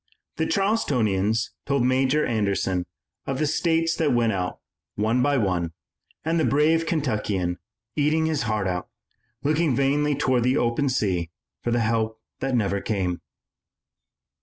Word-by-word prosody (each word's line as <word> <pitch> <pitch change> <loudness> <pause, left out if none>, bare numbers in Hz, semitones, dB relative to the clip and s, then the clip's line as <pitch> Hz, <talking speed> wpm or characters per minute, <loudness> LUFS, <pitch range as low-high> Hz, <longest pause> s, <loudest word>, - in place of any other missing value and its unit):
The - - 0
Charlestonians 115 - +1 0.2
told 140 -3 +2
Major 130 +3 +2
Anderson 100 -5 0 0.4
of 135 - -1
the 155 - +1
states 165 +2 +1
that 155 -3 +2
went 115 -2 +3
out, 90 -1 -2 0.4
one 110 +4 +1
by 145 +2 +2
one, 90 -7 0 0.5
and 165 +1 +1
the - - +2
brave 160 +3 +3
Kentuckian, 105 - -1 0.4
eating 155 +2 +2
his 160 -4 0
heart 105 -2 0
out, 90 -1 -3 0.5
looked 150 +2 +1
vainly 145 -1 +2
toward 130 -3 +2
the 125 +4 +2
open 120 +4 +1
sea 95 -9 0 0.3
for - - -1
the 120 0 +2
help 110 -1 0 0.2
that 135 -1 -1
never 100 -3 0
came. 95 -5 -1
125 Hz, 140 wpm, -24 LUFS, 105-150 Hz, 0.5 s, went